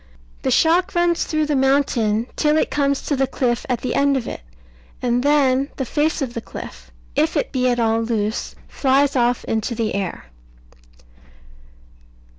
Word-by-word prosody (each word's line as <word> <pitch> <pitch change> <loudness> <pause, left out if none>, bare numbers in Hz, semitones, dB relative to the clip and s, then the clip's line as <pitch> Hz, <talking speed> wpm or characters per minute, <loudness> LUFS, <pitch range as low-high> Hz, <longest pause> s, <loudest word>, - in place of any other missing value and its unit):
The - - -1
shock 355 +4 +3
runs 345 -1 +2
through 310 -1 0
the 300 -1 0
mountain 260 -5 +2
till 300 0 +2
it - - 0
comes 280 -1 0
to 290 - -1
the 270 0 +1
cliff 245 -3 -1
at 245 -3 -1
the 255 - -2
end 280 -1 +2
of 240 - -4
it; - - -6 0.6
and 245 0 0
then 275 -1 +2
the 265 - -3
face 300 +3 0
of 245 -3 -5
the 230 - -4
cliff, - - -10 0.3
if - - +1
it - - -1
be 255 -1 +1
at 245 -1 0
all 225 0 +2
loose, 220 -1 -2
flies 275 +1 +2
off 245 -1 +1
into 225 +2 -2
the 225 -1 -1
air. 195 - -4
260 Hz, 170 wpm, -21 LUFS, 230-285 Hz, 0.6 s, shock